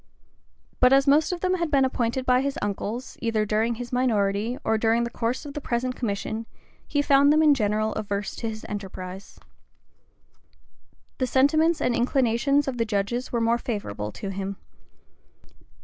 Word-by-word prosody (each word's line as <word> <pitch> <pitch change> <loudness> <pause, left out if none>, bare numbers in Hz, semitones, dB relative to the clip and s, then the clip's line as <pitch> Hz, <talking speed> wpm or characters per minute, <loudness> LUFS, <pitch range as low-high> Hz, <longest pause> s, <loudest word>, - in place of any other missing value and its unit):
[*] - - -39
But 250 +1 +6
as 275 0 +5
most 295 +4 +4
of 355 -1 -4
them 370 0 +1
had 340 -2 -1
been 275 -3 +3
appointed 255 0 -1
by 250 0 +4
his 275 0 -2
uncles, 205 +4 -4
either 225 -2 0
during 220 +3 0
his 245 +1 -7
minority 220 -2 +1
or 220 - +1
during 225 +2 +2
the 235 - -3
course 240 +6 -2
of 285 - -7
the 295 - -5
present 250 0 -2
commission, 220 0 -3 0.4
he 290 -1 0
found 280 0 +5
them 310 +1 +4
in 300 -2 +6
general 215 -3 0
averse 200 -1 -3
to 230 - -3
his 220 0 -8
enterprise. 190 -2 -7 1.8
The 255 - +1
sentiments 310 +5 +3
and 240 - +1
inclinations 260 +3 +2
of 250 -3 -3
the - - +3
judges 220 +3 -2
were 235 - 0
more 230 +1 +2
favorable 105 - -4
to 200 - -6
him. 195 0 -4
235 Hz, 170 wpm, -25 LUFS, 215-270 Hz, 1.8 s, But